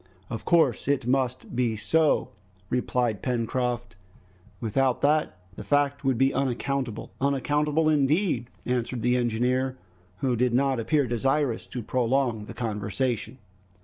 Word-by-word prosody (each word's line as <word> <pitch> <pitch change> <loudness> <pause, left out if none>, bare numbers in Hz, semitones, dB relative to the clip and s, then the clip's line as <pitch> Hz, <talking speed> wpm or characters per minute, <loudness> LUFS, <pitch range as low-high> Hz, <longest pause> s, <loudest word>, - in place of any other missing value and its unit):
"Of 115 - -5
course 160 -10 +3
it 140 -4 +1
must 130 -1 -1
be 120 -3 +1
so," 160 +8 +2 0.4
replied 120 -4 0
Pencroft, 120 -4 -2 0.6
"without 125 +3 +1
that 150 -7 +2 0.2
the - - -7
fact 145 0 +1
would 135 -3 +1
be 135 +2 +3
unaccountable." 135 -2 -2
"Unaccountable 145 +3 +1
indeed," 150 - +2 0.2
answered 125 -1 -2
the 125 +1 +3
engineer, 125 +2 0 0.4
who 125 +5 0
did 120 0 +1
not 135 -1 +2
appear 145 +5 +2
desirous 130 +1 0
to 125 - -5
prolong 120 -2 0
the - - -9
conversation. 115 +2 -2
125 Hz, 125 wpm, -26 LUFS, 120-140 Hz, 0.6 s, course